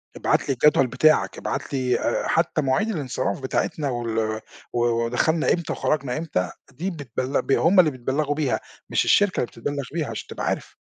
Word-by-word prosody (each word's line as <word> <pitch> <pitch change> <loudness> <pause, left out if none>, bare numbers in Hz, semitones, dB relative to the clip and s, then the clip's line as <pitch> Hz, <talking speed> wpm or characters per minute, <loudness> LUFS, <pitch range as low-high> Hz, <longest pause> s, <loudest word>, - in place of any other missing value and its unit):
ابعت - - 0
لي - - +3
الجدول 135 0 +4
بتاعك، 140 +6 +3
ابعت 140 +1 -4
لي 130 -2 +1
آآ، - - -1
حتى - - +1
مواعيد 135 +11 +1
الانصراف 135 - -2
بتاعتنا 140 +2 -1
وال 115 -3 -1 0.3
و 120 - 0 0.3
ودخلنا 155 +7 +1
إمتى 170 -2 -2
وخرجنا 140 -3 -1
إمتى 90 - -2 0.2
دي 180 +9 -3
بتبل 135 -3 -2
ب - - -4
هم 180 +7 +4
اللي 155 -4 +6
بيتبلغوا 135 +4 -1
بيها، 150 -4 0 0.3
مش - - +2
الشركة 205 -2 +4
اللي 120 - 0
بتتبلغ 140 +5 -4
بيها 160 -4 -1
عشان 115 - -6
تبقى - - -5
عارف. - - -3
140 Hz, 175 wpm, -24 LUFS, 125-155 Hz, 0.3 s, اللي